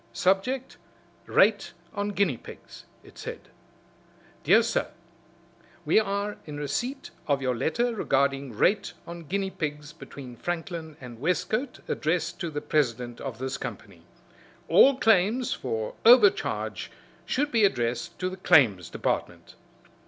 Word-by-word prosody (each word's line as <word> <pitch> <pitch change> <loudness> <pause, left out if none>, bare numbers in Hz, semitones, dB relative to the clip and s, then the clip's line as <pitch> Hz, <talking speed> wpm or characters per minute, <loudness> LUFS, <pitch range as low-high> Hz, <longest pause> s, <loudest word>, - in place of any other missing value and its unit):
"Subject 245 +8 0 0.5
Rate 205 0 +3 0.2
on 205 -1 -2
guinea 200 -8 +1
pigs," - - -13 0.2
it - - -16
said, - - -8 0.9
"Dr. 215 +8 +5
Sir 230 - 0 1.0
We 160 +8 +5
are 200 0 -2
in 150 -1 -6
receipt 240 - -3 0.2
of 140 -1 +2
your 130 -2 -1
letter 235 - 0
regarding 135 - 0
rate 200 - +2
on 170 -1 -9
guinea 195 +4 -2
pigs 150 -2 -5
between 135 -6 -10
Franklin 165 -2 -5
and 120 -3 -10
Westcote 180 - -1
addressed 160 +1 -1
to 170 - -3
the 145 -1 -4
president 125 -5 -1
of 130 -5 -5
this 130 +1 -4
company. - - -8 0.7
All 275 -1 +6
claims 225 +2 +3
for 110 -4 -3
overcharge 375 - +4 0.4
should 290 +3 0
be 225 -2 +3
addressed 125 0 0
to 185 0 -2
the 185 - -7
Claims 125 - +4
Department." - - -3
170 Hz, 130 wpm, -27 LUFS, 140-205 Hz, 1.0 s, All